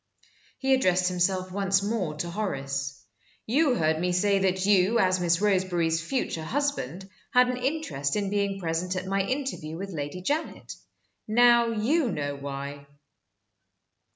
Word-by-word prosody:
He 265 Hz, 0 st, +2 dB
addressed 185 Hz, -8 st, +3 dB
himself 185 Hz, +1 st, 0 dB
once 195 Hz, 0 st, +1 dB
more 200 Hz, -7 st, -2 dB
to 170 Hz, +3 st, -4 dB
Horace. 140 Hz, -8 st, -3 dB, 0.4 s
"You 270 Hz, +3 st, +2 dB
heard 160 Hz, -1 st, +1 dB
me 180 Hz, +1 st, 0 dB
say 200 Hz, +2 st, +2 dB
that 190 Hz, 0 st, +1 dB
you, 200 Hz, +2 st, +4 dB
as 185 Hz, -3 st, +3 dB
Miss 170 Hz, -1 st, +2 dB
Roseberry's 180 Hz, -5 st, +1 dB
future 170 Hz, -5 st, -2 dB
husband, 195 Hz, -, -2 dB, 0.3 s
had 250 Hz, 0 st, +6 dB
an 250 Hz, -, -2 dB
interest 255 Hz, -, -2 dB
in 200 Hz, -2 st, -1 dB
being 200 Hz, -1 st, 0 dB
present 175 Hz, +1 st, -2 dB
at 185 Hz, 0 st, -3 dB
my 195 Hz, +1 st, 0 dB
interview 225 Hz, -, -3 dB
with 195 Hz, +2 st, -6 dB
Lady 150 Hz, +2 st, -5 dB
Janet. 300 Hz, -, -3 dB, 0.5 s
Now 235 Hz, +1 st, +5 dB
you 235 Hz, +5 st, +1 dB
know 145 Hz, -1 st, -3 dB
why." 140 Hz, 0 st, -7 dB
190 Hz, 145 wpm, -27 LUFS, 165-225 Hz, 0.5 s, had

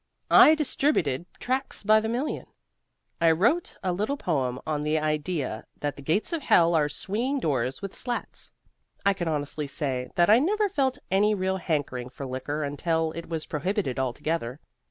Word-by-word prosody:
I 310 Hz, -, +9 dB
distributed 255 Hz, -, +1 dB
tracts 260 Hz, -1 st, -2 dB
by 215 Hz, +1 st, +6 dB
the 220 Hz, +1 st, -2 dB
million; 250 Hz, +6 st, -2 dB, 0.7 s
I 165 Hz, -, +6 dB
wrote 230 Hz, -, +2 dB
a 185 Hz, -, 0 dB
little 215 Hz, +10 st, -1 dB
poem 130 Hz, -, -1 dB
on 150 Hz, -1 st, -1 dB
the 150 Hz, +1 st, +1 dB
idea 150 Hz, -5 st, -2 dB
that 145 Hz, -1 st, -2 dB
the -, -, -10 dB
gates 165 Hz, -, 0 dB
of 330 Hz, -, -1 dB
hell 170 Hz, -9 st, +4 dB
are 150 Hz, -2 st, +3 dB
swinging 230 Hz, -, -2 dB
doors 135 Hz, -, -1 dB
with 195 Hz, -, -5 dB
slats. 245 Hz, -1 st, -3 dB, 0.5 s
I 200 Hz, -, +5 dB
can 175 Hz, -3 st, -4 dB
honestly 150 Hz, -1 st, -2 dB
say 135 Hz, -3 st, -2 dB
that 175 Hz, 0 st, +4 dB
I 220 Hz, +3 st, +7 dB
never 415 Hz, +8 st, +2 dB
felt 270 Hz, -8 st, 0 dB
any 210 Hz, +2 st, +3 dB
real 190 Hz, 0 st, 0 dB
hankering 145 Hz, -8 st, -2 dB
for 135 Hz, +2 st, -8 dB
liquor 135 Hz, +4 st, -3 dB
until 160 Hz, +3 st, 0 dB
it 165 Hz, +1 st, -8 dB
was 160 Hz, -2 st, -3 dB
prohibited 170 Hz, -, -2 dB
altogether. 130 Hz, 0 st, -2 dB
165 Hz, 170 wpm, -26 LUFS, 145-215 Hz, 0.7 s, I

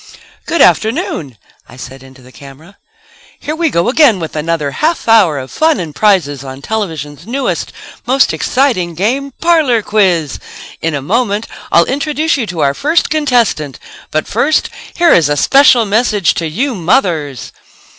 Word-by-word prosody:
"Good 335 Hz, -, +3 dB
afternoon," 180 Hz, -, 0 dB, 0.3 s
I -, -, -14 dB
said 130 Hz, +1 st, -10 dB
into 130 Hz, -1 st, -16 dB
the 130 Hz, -, -16 dB
camera, 145 Hz, +9 st, -15 dB, 0.6 s
"here 305 Hz, -, -4 dB
we 330 Hz, 0 st, 0 dB
go 170 Hz, -8 st, 0 dB
again 250 Hz, -5 st, +4 dB
with 160 Hz, -2 st, -6 dB
another 155 Hz, -2 st, -2 dB
half 320 Hz, -, -1 dB
hour 205 Hz, -10 st, +4 dB
of 130 Hz, -1 st, -7 dB
fun 315 Hz, -7 st, +1 dB
and 165 Hz, -4 st, -6 dB
prizes 145 Hz, -8 st, +1 dB
on 135 Hz, 0 st, -9 dB
television's 160 Hz, -7 st, -5 dB
newest, 265 Hz, +3 st, -3 dB, 0.4 s
most 265 Hz, +2 st, +2 dB
exciting, 230 Hz, -11 st, 0 dB
game, 250 Hz, -, -1 dB
'Parlor 310 Hz, -10 st, +2 dB
Quiz.' 180 Hz, -9 st, 0 dB, 0.4 s
In 165 Hz, -2 st, -1 dB
a 140 Hz, -, -4 dB
moment 215 Hz, -, -1 dB, 0.3 s
I'll 170 Hz, -, +5 dB
introduce 300 Hz, +4 st, -1 dB
you 245 Hz, -6 st, -3 dB
to 175 Hz, -4 st, -4 dB
our 140 Hz, -, +2 dB
first 310 Hz, -, 0 dB
contestant. 245 Hz, -, 0 dB, 0.3 s
But 155 Hz, -, -2 dB
first 280 Hz, +8 st, 0 dB, 0.2 s
here 345 Hz, -1 st, +4 dB
is 155 Hz, -4 st, +3 dB
a 145 Hz, -, 0 dB
special 260 Hz, -, +4 dB
message 210 Hz, -3 st, +1 dB
to 165 Hz, -, -3 dB
you 255 Hz, -, -2 dB
mothers 165 Hz, -, -1 dB
200 Hz, 155 wpm, -13 LUFS, -, 0.6 s, I'll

